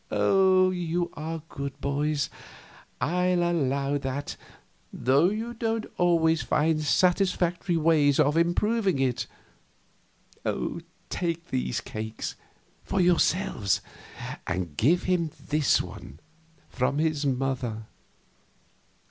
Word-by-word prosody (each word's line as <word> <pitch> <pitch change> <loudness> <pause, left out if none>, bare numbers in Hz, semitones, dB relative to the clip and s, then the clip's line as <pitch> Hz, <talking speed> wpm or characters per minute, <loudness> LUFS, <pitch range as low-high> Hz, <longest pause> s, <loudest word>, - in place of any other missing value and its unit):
You 180 - +2
are 160 +1 -5
good 140 -3 -6
boys, 145 +1 -1 0.7
I'll 180 +2 +1
allow 140 -4 0
that, 135 +1 -4 0.6
though 140 +7 +3
you 225 +3 -3
don't 225 -1 -1
always 165 -2 +3
find 155 +1 +1
satisfactory 180 +1 +2
ways 150 -3 +3
of 145 +2 +4
improving 190 +3 +2
it. 130 -2 0 1.8
Take 170 -1 -2
these 125 -2 -1
cakes 110 0 -5 0.5
for 195 - -1
yourselves 180 - +2 0.7
and 85 -4 -3
give 165 - +3
him 180 -3 +1
this 150 -2 +2
one, 70 - -10 0.5
from 135 +2 -1
his 155 -1 +1
mother." 125 -4 -2
160 Hz, 95 wpm, -27 LUFS, 135-180 Hz, 1.8 s, of